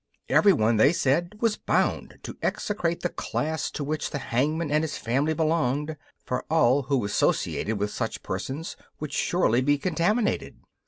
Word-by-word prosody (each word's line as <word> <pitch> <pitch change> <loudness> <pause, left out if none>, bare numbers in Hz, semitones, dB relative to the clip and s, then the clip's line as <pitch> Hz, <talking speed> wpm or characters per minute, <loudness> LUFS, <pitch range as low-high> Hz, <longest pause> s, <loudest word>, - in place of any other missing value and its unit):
Everyone, 120 - +4
they 140 +9 +5
said, 170 +6 +1
was 225 -3 +2
bound - - 0
to - - -7
execrate 175 -5 -1
the 175 - 0
class 160 -1 -2
to 150 - -5
which 150 +1 -2
the - - -3
hangman 145 +5 -1
and 150 +1 +2
his 155 -3 -3
family 140 +7 0
belonged, 155 -2 0 0.3
for 125 0 -2
all 145 -4 +4
who 135 -4 0
associated 105 +1 0
with 105 +1 -1
such - - -4
persons 135 - -4 0.2
would 150 -2 -5
surely 130 -9 +2
be 145 +2 +3
contaminated. 190 +8 0
150 Hz, 155 wpm, -26 LUFS, 130-165 Hz, 0.3 s, they